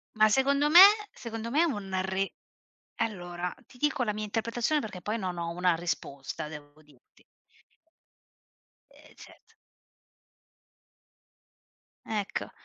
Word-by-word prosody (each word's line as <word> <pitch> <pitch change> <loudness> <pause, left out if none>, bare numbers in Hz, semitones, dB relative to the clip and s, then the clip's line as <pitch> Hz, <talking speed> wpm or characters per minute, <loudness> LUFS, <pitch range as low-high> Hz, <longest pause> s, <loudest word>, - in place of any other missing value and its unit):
Ma 215 0 +5
secondo 280 +5 +2
me 345 +4 +10 0.3
secondo 225 -1 -6
me 290 +6 +2
è - - +5
un 200 - -2
re 190 +1 -2 0.7
allora, 175 -5 -3
ti 260 - -19
dico 295 -1 0
la 210 - -1
mia 215 +1 -4
interpretazione, 230 +7 -1
perché 195 -4 -7
poi 215 +2 -2
non 185 -4 -4
ho 170 0 -3
una 180 0 +1
risposta, 150 -4 -5
devo 150 0 -12
dirti. 145 -5 -25 1.7
Ehm, - - -20
certo. - - -17 2.5
Ecco. 210 -3 -3
205 Hz, 120 wpm, -28 LUFS, 175-235 Hz, 2.5 s, me